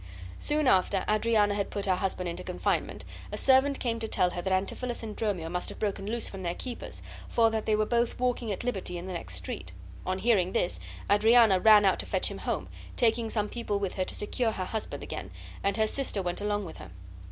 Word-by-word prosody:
Soon 300 -1 +1
after 190 -3 +3
Adriana 215 -1 +3
had 200 -1 -1
put 200 - -3
her 185 -2 +2
husband 185 -1 -2
into 170 - -4
confinement - - -2 0.3
a - - -3
servant 270 +1 +4
came 230 -2 -1
to 225 - -2
tell 180 -4 +2
her 175 - -4
that 190 - -2
Antipholus 235 +6 -1
and 215 -2 -5
Dromio 200 -7 -1
must 180 +2 -2
have - - -8
broken 200 -2 -2
loose 235 +2 0
from 195 - -7
their 175 -1 -2
keepers, 250 -2 -6 0.3
for 225 -1 +4
that 220 -1 -2
they 215 - +4
were 215 0 +2
both 235 +1 0
walking 245 -3 0
at 195 - -3
liberty 195 -7 -2
in 175 - -6
the 190 - -5
next 90 - -4
street. 90 0 -5 0.3
On 185 0 -1
hearing 190 -4 +2
this 175 - +1 0.3
Adriana 220 -1 +6
ran 210 0 +7
out 190 - +3
to - - -4
fetch - - 0
him - - -6
home, - - -2 0.3
taking 230 -1 +2
some 210 -2 0
people 230 -3 -2
with 195 -2 -2
her 185 - -1
to - - -6
secure 225 +2 -1
her 185 - -3
husband 220 +2 -4
again; - - -6 0.3
and 200 +1 +1
her 220 - +3
sister 215 -4 -1
went 175 +2 -2
along 205 -1 -1
with 165 - -9
her. 85 - -10
205 Hz, 225 wpm, -29 LUFS, 185-230 Hz, 0.3 s, ran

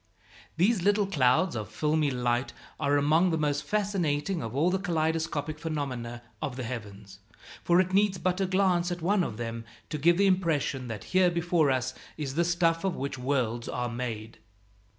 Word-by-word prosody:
These 195 +3 +3
"little 205 +2 +3
clouds" 150 -2 +2
of 105 -4 -4
filmy 155 -1 +1
light 125 -1 -1 0.3
are 145 +1 +2
among 155 +5 +3
the 165 - 0
most 145 -1 0
fascinating 185 -2 -1
of 115 +1 -5
all 165 +6 +3
the 190 - 0
kaleidoscopic 160 -3 -1
phenomena 130 -7 -4 0.2
of 130 - -3
the 130 - -4
heavens; 105 -5 -7 0.4
for 175 +1 +4
it 185 0 +1
needs 200 -1 +3
but 185 +1 -1
a 190 - +1
glance 185 -2 +2
at 175 -2 -4
one 195 +1 +3
of 110 - -4
them 115 -1 -4 0.3
to 150 - -2
give 170 +4 +4
the 200 - +4
impression 165 -8 +1
that 110 -3 -6
here 185 -1 +5
before 170 -3 +1
us 130 0 0 0.2
is 145 -4 -3
the 170 +4 +2
stuff 170 -1 +1
of 190 -2 0
which 135 -1 -4
worlds 125 -3 -1
are 125 0 -2
made. 115 -2 -5
155 Hz, 180 wpm, -28 LUFS, 125-180 Hz, 0.4 s, here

